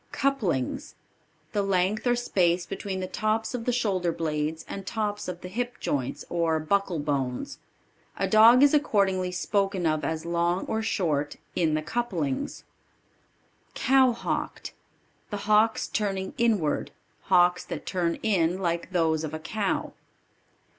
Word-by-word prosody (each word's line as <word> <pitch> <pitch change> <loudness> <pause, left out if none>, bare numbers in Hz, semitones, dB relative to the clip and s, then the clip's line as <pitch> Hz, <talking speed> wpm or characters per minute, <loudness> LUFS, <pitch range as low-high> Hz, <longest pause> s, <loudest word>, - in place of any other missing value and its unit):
Couplings. 210 - -1 0.6
The 205 - 0
length 195 +3 +1
or 245 - +4
space 180 -7 +1
between 190 0 -4
the - - -2
tops 215 +4 -1
of 235 -2 -4
the 245 - +2
shoulder 195 -8 0
blades 155 -1 -2
and 195 - -6
tops 210 0 -3
of 180 -1 -5
the - - -7
hip 240 +6 -4
joints, 140 +1 -2
or 165 -2 +1
buckle 185 +3 0
bones. 140 -4 -2 0.6
A - - 0
dog 230 +4 +7
is 285 - +6
accordingly 195 -10 +2
spoken 195 0 0
of 155 -1 +1
as 160 0 -2
long 170 +2 0
or 220 - -1
short 150 -9 -1 0.2
"in 160 -3 +2
the 155 - -1
couplings." 170 - -2 1.1
Cow 265 -1 +4
hocked. 235 - -4 0.6
The 205 -1 -5
hocks 215 +1 +3
turning 195 -3 -2
inward; 220 - +1 0.4
hocks 180 -1 +4
that - - -6
turn 175 -3 0
in, 180 -5 +2
like 170 -2 -2
those 160 -3 +1
of 155 0 -4
a - - -5
cow. 200 +5 -2
185 Hz, 140 wpm, -27 LUFS, 165-215 Hz, 1.1 s, dog